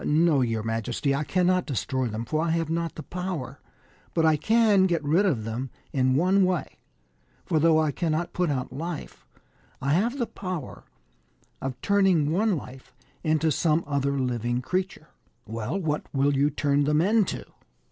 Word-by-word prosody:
" - - -9
No, 155 -2 +3
your 115 -3 -1
majesty, 115 +5 -1
I 140 +2 0
cannot 180 +2 +1
destroy 130 -1 -1
them, 110 +1 -4
for 155 +6 -1
I 170 - 0
have 165 -1 0
not 165 0 -2
the 155 - -7
power; 170 -8 -5 0.6
but 165 -1 +3
I 160 -1 +5
can 210 +2 +4
get 170 -4 0
rid 165 +8 +3
of 125 - 0
them 115 +4 -4 0.2
in 130 -1 +2
one 185 +6 +3
way; 185 -3 -1 0.7
for 160 - +1
though 160 0 +4
I 155 -2 +1
cannot 165 +3 -2
put 180 -2 0
out 130 -3 -2
life, 165 +2 -6 0.5
I 140 +2 0
have 230 - +1
the 240 - 0
power 185 - -6 0.8
of 135 -1 -4
turning 190 -7 +3
one 200 +2 +2
life 130 -1 -10 0.3
into 155 -1 +2
some 160 +3 +2
other 140 -1 0
living 120 -2 -1
creature." 180 +1 -3 0.2
" - - -44
Well, 115 - -3
what 150 -4 -2
will 140 +1 +2
you 140 +2 +3
turn 145 -1 +1
them 150 +1 +2
into 205 +4 +1
155 Hz, 175 wpm, -26 LUFS, 135-180 Hz, 0.8 s, I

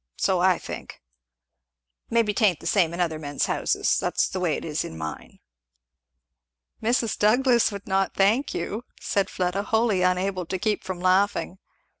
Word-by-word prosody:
So 185 -2 +1
I 185 -1 +4
think. - - -8 1.1
Maybe 225 -2 +2
'tain't 200 -6 +2
the - - -13
same 175 -6 +2
in 170 - -6
other 160 -3 0
men's 145 -2 -2
houses. - - +1
That's - - 0
the - - -4
way - - +1
it - - -6
is - - -2
in 80 - -8
mine." 80 -1 -7 1.4
"Mrs. 230 0 +1
Douglass 240 +2 +3
would 200 -1 -7
not 195 0 0
thank 215 +8 +2
you," 215 +4 -3 0.2
said 200 -1 0
Fleda, 180 +2 -1
wholly 220 -2 +1
unable 185 0 0
to 190 - -2
keep 210 +2 -1
from 185 -2 -5
laughing. 190 0 +1
195 Hz, 160 wpm, -25 LUFS, 180-215 Hz, 1.4 s, I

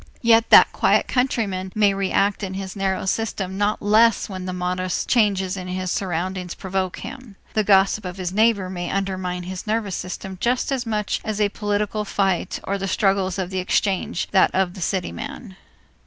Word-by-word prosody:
Yet 230 0 +5
that - - +8
quiet - - +2
countryman 210 -8 -1
may 205 -2 +4
react 195 +1 +1
in 190 -2 -4
his 190 0 -5
narrow 190 -1 -1
system 190 -2 -2
not 205 +2 0
less 220 +2 +4
when 185 -2 -6
the - - -2
modest 180 0 -2
changes 200 -5 +2
in 185 -1 -6
his 185 0 -3
surroundings 180 0 -3
provoke 190 -1 -3
him. 255 -6 -9 0.2
The 215 - +2
gossip 195 +1 +3
of 180 0 -6
his 180 -1 -3
neighbor 215 -2 +3
may 175 -1 -4
undermine 185 -2 -2
his 185 +3 -7
nervous 210 -4 -1
system 185 +1 -6
just 245 +3 +1
as 255 -3 -2
much 210 -2 -1
as 215 -1 -3
a 205 -1 +3
political 210 +1 -1
fight 195 -3 -1
or 200 0 -2
the 195 - -2
struggles 195 -1 +1
of 185 -1 -3
the 190 - -1
exchange 185 -1 0
that 190 - +5
of 185 -2 +1
the 190 - -9
city 180 +2 -1
man. 250 -8 -8
195 Hz, 185 wpm, -22 LUFS, 185-210 Hz, 0.2 s, that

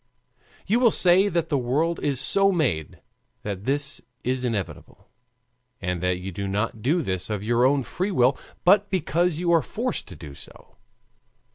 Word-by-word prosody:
You 220 +5 +2
will 245 -2 +5
say 190 0 +4
that 170 -2 -1
the 145 -4 +1
world 150 +8 0
is 140 -3 0
so 195 +6 +3
made 125 - -1 0.4
that 100 -1 -5
this 140 +1 0 0.2
is 130 +1 -1
inevitable, 110 -6 -5 0.7
and 90 -2 -3
that 90 0 0
you 95 +2 -6
do 100 +2 -4
not 105 +3 -2
do 155 +9 +1
this 95 -4 -3
of 105 -2 -3
your 120 +3 +2
own 135 0 +3
free 185 +10 -3
will, 130 -8 +3 0.3
but 205 +3 +5
because 175 -2 0
you 175 0 0
are 165 -1 +5
forced 245 +8 -3
to 95 - -10
do 75 -2 -10
so. - - -14
135 Hz, 170 wpm, -24 LUFS, -, 0.7 s, will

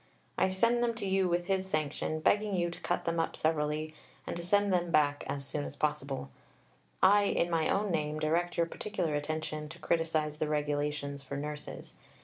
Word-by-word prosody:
I - - +3
send 230 +6 +2
them 235 -1 +1
to 225 - -4
you 190 -1 +2
with 175 0 +1
his 190 0 0
sanction, 155 0 -1
begging 205 +3 +2
you 175 -1 +1
to - - -9
cut 175 - -1
them 170 0 0
up 165 - 0
severely, 155 0 0 0.3
and - - -4
to 170 - -4
send 200 +3 +2
them 175 -1 +1
back 145 -3 +3
as 140 -1 -3
soon 145 +2 -3
as 145 - -6
possible. 140 - -2 0.7
I, 205 +2 +7
in 175 -3 +1
my 160 -1 +2
own 200 0 +1
name, 155 -2 -1
direct 165 +3 0
your 170 - +4
particular 170 -2 -3
attention 155 0 -3
to 165 - -10
criticize 155 -2 0
the 155 - 0
Regulations 145 -1 -1
for 140 0 -5
Nurses. 150 +1 -6
160 Hz, 190 wpm, -31 LUFS, 150-180 Hz, 0.7 s, I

